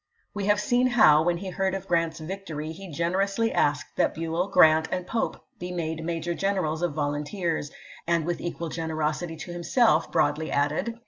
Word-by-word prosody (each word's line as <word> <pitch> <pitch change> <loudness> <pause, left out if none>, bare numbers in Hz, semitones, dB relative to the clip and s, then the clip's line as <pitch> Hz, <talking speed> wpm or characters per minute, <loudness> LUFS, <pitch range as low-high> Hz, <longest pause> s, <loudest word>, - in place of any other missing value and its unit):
We 205 -1 -3
have 205 0 +3
seen 245 +4 +2
how, 215 -12 +6
when 170 +1 +1
he 190 +1 -6
heard 190 0 -1
of 195 - -6
Grant's 165 -1 0
victory, 160 -3 -5
he 190 +3 -9
generously 195 +8 0
asked 145 -2 0
that - - +2
Buell, 165 +3 -1
Grant, 160 -4 +5
and 180 -1 -2
Pope 225 +4 -3
be 180 0 -5
made 160 -2 -3
major 170 +1 -2
generals 180 -4 -1
of 175 -4 -1
volunteers^ 150 +2 -2 0.4
and 170 -2 +1
with 175 0 -2
equal 170 -1 -4
generosity 160 0 -2
to 175 - -7
himself 175 +8 +2
broadly 150 +2 +1
added, 145 +7 0
Vol. 230 - -20
170 Hz, 180 wpm, -26 LUFS, 155-190 Hz, 0.4 s, how